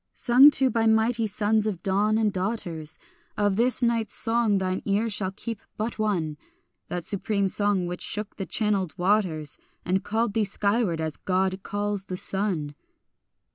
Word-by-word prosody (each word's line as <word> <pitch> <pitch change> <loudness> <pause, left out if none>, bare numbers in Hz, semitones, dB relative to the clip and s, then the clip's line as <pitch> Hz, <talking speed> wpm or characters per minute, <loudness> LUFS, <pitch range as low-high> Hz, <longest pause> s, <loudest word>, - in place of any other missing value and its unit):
Sung 255 +4 +7
to 265 -3 +2
by 225 0 +1
mighty 220 +1 +2
sons 215 +1 +1
of 185 -5 -4
dawn 205 +3 +2
and 215 -2 +1
daughters, 180 -6 -3 0.4
Of 205 -2 +1
this 245 +3 +3
night's 230 -2 +1
songs 225 -3 +3
thine 185 0 -2
ear 210 +3 0
shall 195 -2 -1
keep 220 +2 -6 0.2
but 220 +1 -4
one; 175 -8 -1 0.5
That 175 -1 -4
supreme 200 +2 -1
song 205 -1 0
which 180 0 -5
shook 210 0 -4
the 195 - -5
channelled 205 -6 0
waters, 175 -6 0 0.3
And 185 +2 0
called 220 0 -1
thee 220 - +1
skyward 200 -3 0
as 155 -1 -4
God 190 0 -1
calls 205 -1 -3
the 185 - -5
sun. 180 -7 0
205 Hz, 160 wpm, -25 LUFS, 185-220 Hz, 0.5 s, Sung